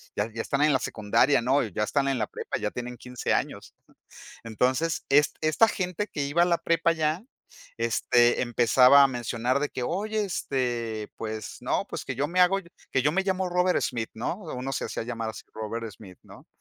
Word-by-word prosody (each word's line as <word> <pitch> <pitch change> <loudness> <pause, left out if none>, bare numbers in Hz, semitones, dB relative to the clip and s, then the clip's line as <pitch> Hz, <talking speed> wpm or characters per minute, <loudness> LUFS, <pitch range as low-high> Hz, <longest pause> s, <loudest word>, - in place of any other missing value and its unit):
ya 105 +2 -1
ya 115 - -3
están 140 +4 -1
en 150 -2 +4
la 130 - +3
secundaria, 115 +5 +2
¿no? 130 +4 +2
Y 110 - -5
ya 105 - -1
están 140 +5 0
en 135 - 0
la 110 - -1
prepa, - - -5
ya 105 - -1
tienen 125 0 -6
15 125 0 -4
años". - - -3 0.7
Entonces 130 +8 0
es 145 +1 +4
esta 155 +9 +4
gente 185 +2 -2
que 145 - -4
iba 155 +5 +2
a - - +6
la 170 -1 +3
prepa 165 0 +2
ya, 155 +2 -1 0.6
este, 120 +1 +3
empezaba 125 +3 +6
a 140 - +7
mencionar 125 +1 -1
de 145 - 0
que: 125 - -5
"Oye, 210 +6 -1
este, 120 - -2
pues 110 -1 -6
no, - - -1
pues - - -5
que 135 - -3
yo 140 +3 0
me 180 +2 +1
hago 180 +2 +5 0.3
que 130 - +1
yo 150 +3 +2
me 195 - +1
llamo 190 -1 -1
Robert 180 +1 +2
Smith, 115 -3 -2
¿no?". 120 +10 -3
Uno 135 -4 -5
se - - -2
hacía - - -4
llamar 115 -1 -4
así, - - -10
Robert 110 +1 -5
Smith, 95 -5 -14
¿no? - - -15
130 Hz, 205 wpm, -26 LUFS, 115-165 Hz, 0.7 s, a